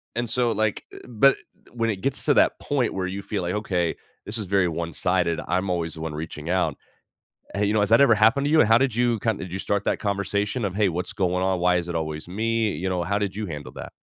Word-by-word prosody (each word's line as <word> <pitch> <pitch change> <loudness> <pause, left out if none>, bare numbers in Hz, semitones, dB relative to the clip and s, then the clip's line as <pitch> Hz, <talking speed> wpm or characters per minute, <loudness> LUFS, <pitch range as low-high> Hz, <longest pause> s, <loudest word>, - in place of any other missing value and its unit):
And 120 -1 -1
so, 120 -1 +2
like, 110 -1 -1
uh - - -10
but 125 +4 +4 0.3
when 115 -1 -1
it 105 - -2
gets 135 +5 0
to - - +4
that - - +3
point 135 -5 -1
where 95 -1 -2
you 95 +2 -5
feel 90 - -3
like, 90 +3 -2
"Okay, 90 -5 -1 0.3
this 105 - -2
is 105 - -4
very 95 -2 +2
one-sided, 85 +1 -1
I'm 90 +2 0
always 85 -2 -1
the 80 - -5
one 80 -1 -4
reaching 80 +1 -6
out." 90 0 +1 0.8
Hey, 100 +1 0
you 105 - +1
know, 110 - +2
has 105 - +1
that 115 +4 +6
ever 120 -5 +6
happened 115 +7 +3
to 145 - 0
you? 160 - +5
And 110 - +5
how 115 +1 +6
did 130 -3 0
you 120 -2 +1
kind 110 -1 0
did 90 - -7
you 95 - -4
start 100 0 -1
that - - 0
conversation 100 +2 -1
of, 95 - -3
"Hey, 105 -2 +2
what's 90 +1 -3
going 90 -1 0
on? 95 -1 +1
Why 90 0 +3
is 85 0 -3
it 85 - -4
always 80 0 -3
me?" 110 +2 0
You 95 +5 -3
know, 90 -1 -1
how 100 +3 -1
did 100 -2 -2
you 105 0 -3
handle 75 -4 -7
that? - - -8
100 Hz, 265 wpm, -24 LUFS, 90-110 Hz, 0.8 s, that